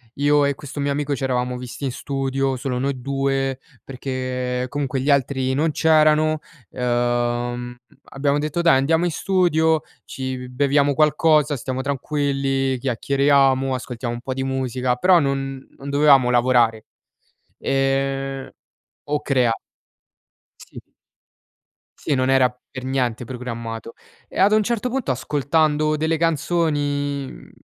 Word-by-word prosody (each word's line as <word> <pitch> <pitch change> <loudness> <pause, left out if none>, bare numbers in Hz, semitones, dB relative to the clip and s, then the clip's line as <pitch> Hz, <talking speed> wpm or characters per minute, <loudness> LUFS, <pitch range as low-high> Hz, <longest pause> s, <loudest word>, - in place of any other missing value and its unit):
io 145 +1 +3
e 140 0 0
questo 145 +1 -8
mio 140 0 0
amico 145 0 -1
c'eravamo 125 -2 -1
visti 125 +3 -8
in 135 - -1
studio, 135 0 -2
solo 125 -1 -3
noi 135 0 -2
2 135 0 -1 0.2
perché 125 -1 -3
comunque 140 0 -2
gli 145 +2 +2
altri 130 -1 +1
non 155 +4 +1
c'erano, 155 0 +3 0.3
ehm, 120 0 -1 0.3
abbiamo 140 +1 0
detto: 155 +3 -1
"Dai 150 -6 +5
andiamo 160 +6 +2
in 175 - 0
studio, 160 -4 +2 0.2
ci 130 -1 -5
beviamo 140 +2 +2
qualcosa, 150 0 +3
stiamo 130 0 -4
tranquilli, 135 -1 -1
chiacchieriamo, 135 +1 +2
ascoltiamo 125 -1 -5
un 120 - -8
po' 130 +1 -4
di 135 0 -3
musica". 130 -1 -1
Però 180 +7 +5
non 135 -2 -2
non 140 - -8
dovevamo 140 -3 +5
lavorare. 120 -3 +3 0.7
Ehm, 135 0 -1 0.6
o 145 0 -1
crea 125 -4 +2 1.2
Sì. - - -11 1.2
Sì, - - -2
non 130 0 +1
era 130 -1 +4 0.2
per 130 - -7
niente 125 -3 -1
programmato. 115 -2 -6 0.3
E - - -7
ad 195 +2 +5
un 215 0 +4
certo 235 +2 -1
punto 250 - -1
ascoltando 150 +3 +1
delle 160 +1 0
canzoni, 145 -3 0
mhmm, - - -13
135 Hz, 130 wpm, -22 LUFS, 130-145 Hz, 1.2 s, Dai